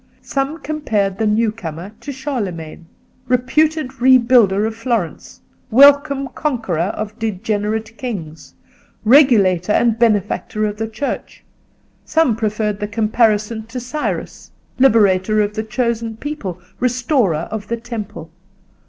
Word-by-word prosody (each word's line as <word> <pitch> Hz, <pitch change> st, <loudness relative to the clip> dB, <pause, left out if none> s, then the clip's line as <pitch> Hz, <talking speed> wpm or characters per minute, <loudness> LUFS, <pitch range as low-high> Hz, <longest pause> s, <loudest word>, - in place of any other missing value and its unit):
Some 275 Hz, +3 st, -2 dB
compared 210 Hz, -11 st, -1 dB
the 220 Hz, -, +1 dB
new 215 Hz, +1 st, +2 dB
comer 175 Hz, -3 st, -7 dB
to 285 Hz, -, -6 dB
Charlemagne, 200 Hz, -, -5 dB, 0.4 s
reputed 280 Hz, +4 st, +1 dB
rebuilder 240 Hz, -5 st, +5 dB
of 220 Hz, -, -2 dB
Florence, 230 Hz, -7 st, -3 dB, 0.3 s
welcome 280 Hz, +2 st, +5 dB
conqueror 220 Hz, -, -2 dB
of 215 Hz, +1 st, -5 dB
degenerate 220 Hz, +1 st, -2 dB
kings, 170 Hz, -11 st, -7 dB, 0.5 s
regulator 210 Hz, -, +5 dB
and 230 Hz, -1 st, +2 dB
benefactor 215 Hz, -1 st, +1 dB
of 210 Hz, 0 st, -3 dB
the 220 Hz, 0 st, -2 dB
Church; 250 Hz, +6 st, -5 dB, 0.6 s
some 320 Hz, -7 st, +2 dB
preferred 215 Hz, -1 st, -1 dB
the 210 Hz, -, -2 dB
comparison 220 Hz, 0 st, +1 dB
to 250 Hz, +2 st, -5 dB
Cyrus, 275 Hz, +5 st, -4 dB, 0.3 s
liberator 215 Hz, -5 st, +4 dB
of 210 Hz, 0 st, +1 dB
the 220 Hz, -, -2 dB
chosen 230 Hz, 0 st, -2 dB
people, 225 Hz, -, -5 dB, 0.2 s
restorer 245 Hz, -, +1 dB
of 215 Hz, -1 st, -5 dB
the 235 Hz, -, -2 dB
Temple. 215 Hz, -9 st, -7 dB
225 Hz, 120 wpm, -18 LUFS, 205-255 Hz, 0.6 s, rebuilder